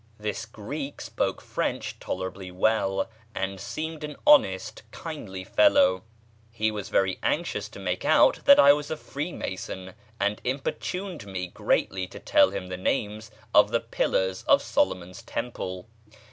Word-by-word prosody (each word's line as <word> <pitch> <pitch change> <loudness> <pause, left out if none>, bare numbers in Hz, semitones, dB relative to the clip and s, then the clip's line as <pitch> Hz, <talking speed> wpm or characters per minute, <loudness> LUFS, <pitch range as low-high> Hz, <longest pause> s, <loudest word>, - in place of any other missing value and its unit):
This 105 +1 -3
Greek 135 +7 -6
spoke - - -2
French - - -3
tolerably 95 0 -5
well, 95 +1 +1 0.3
and 95 0 -2
seemed 160 +8 -5
an 150 -1 -5
honest, 295 - +4
kindly 110 - -7
fellow. 95 0 +4 0.5
He 110 -1 0
was 105 -2 -5
very 95 -1 +1
anxious 170 +2 -1
to - - -11
make - - -2
out - - +5
that 280 - +8
I 140 0 +9
was 145 0 -3
a 160 - -3
free 150 +3 -5
mason, 95 - -6 0.3
and 100 +1 0
importuned 150 - -3
me 95 -2 -3
greatly 95 +1 0
to 95 - -10
tell 295 -1 +4
him - - -5
the 90 - -4
names 105 +2 -2 0.2
of 105 0 +7
the 115 +1 +2
pillars 95 -3 0
of - - +5
Solomon's 90 0 -1
temple. 95 -5 -5
105 Hz, 145 wpm, -26 LUFS, 95-145 Hz, 0.5 s, I